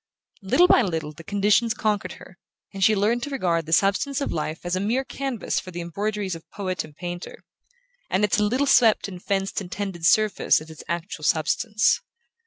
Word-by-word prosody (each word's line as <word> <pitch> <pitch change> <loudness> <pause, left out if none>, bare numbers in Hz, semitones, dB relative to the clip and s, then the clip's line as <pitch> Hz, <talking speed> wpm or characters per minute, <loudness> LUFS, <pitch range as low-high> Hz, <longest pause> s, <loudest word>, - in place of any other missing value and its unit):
Little 305 - +4
by 260 - +6
little 160 -7 -2
the 165 - -12
conditions 210 +5 +2
conquered 205 -5 -1
her, 185 - -15 0.3
and 195 -1 -2
she 215 +3 +5
learned 220 +4 +1
to 285 - -4
regard 175 - -1
the - - -6
substance 200 - +2
of 280 - -2
life 155 +1 -3
as 175 +1 -1
a - - -1
mere 230 +7 0
canvas 270 -4 -3
for - - -10
the 175 -1 -6
embroideries 195 +3 -3
of 165 -1 -10
poet 185 -2 -3
and 150 - -14
painter, 175 +1 -7 0.7
and 190 +3 +1
its 210 +1 +2
little 240 +7 +1
swept 235 -6 +4
and 185 -3 -9
fenced 195 0 -1
and 180 -2 -9
tended 190 -5 -2
surface 215 +3 +3
as 155 +1 -11
its 160 - -11
actual 170 -2 -4
substance. 210 +8 +2
195 Hz, 195 wpm, -24 LUFS, 175-215 Hz, 0.7 s, by